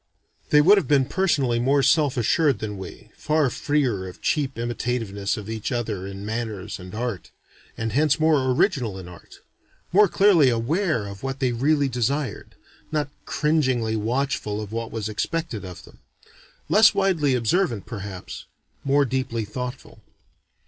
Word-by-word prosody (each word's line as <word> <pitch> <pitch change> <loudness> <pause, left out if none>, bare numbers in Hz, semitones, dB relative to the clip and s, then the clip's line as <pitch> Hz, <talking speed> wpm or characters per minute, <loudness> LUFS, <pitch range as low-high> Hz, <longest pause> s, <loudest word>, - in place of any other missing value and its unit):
They 150 - +6
would 200 +6 +6
have - - -5
been 140 -3 +3
personally 140 -7 +1
more 135 +3 +2
self 145 -1 +3
assured 140 +3 +2
than 105 -1 -5
we, 95 - -10
far 150 -4 +1
freer 125 -12 0
of 90 - -11
cheap 140 -4 -1
imitativeness 115 -4 -2
of 105 -2 -7
each 110 +3 -4
other 110 -6 -3
in 100 +1 -7
manners 110 -4 -4
and 90 +2 -9
art, 115 -6 -4 0.5
and 115 0 -2
hence 150 +2 +2
more 155 -5 +3
original 125 - +1
in 95 -2 -9
art; 90 -1 -14 0.5
more 205 +2 +6
clearly 180 -7 +5
aware 125 - 0
of 100 -1 -8
what 135 0 -3
they 130 -2 0
really 140 +4 +2
desired; 135 +3 -2 0.4
not 150 -2 -1 0.2
cringingly 130 -8 +1
watchful 110 -1 -1
of 105 -1 -6
what 115 0 -4
was 110 -2 -3
expected 115 +2 -3
of 90 -2 -9
them; - - -17 0.7
less 220 +1 +6
widely 170 -9 +2
observant 120 - 0
perhaps, 100 -5 -7 0.4
more 140 +1 +3
deeply 125 -3 -2
thoughtful. 125 +4 -7
125 Hz, 150 wpm, -24 LUFS, 110-150 Hz, 0.7 s, They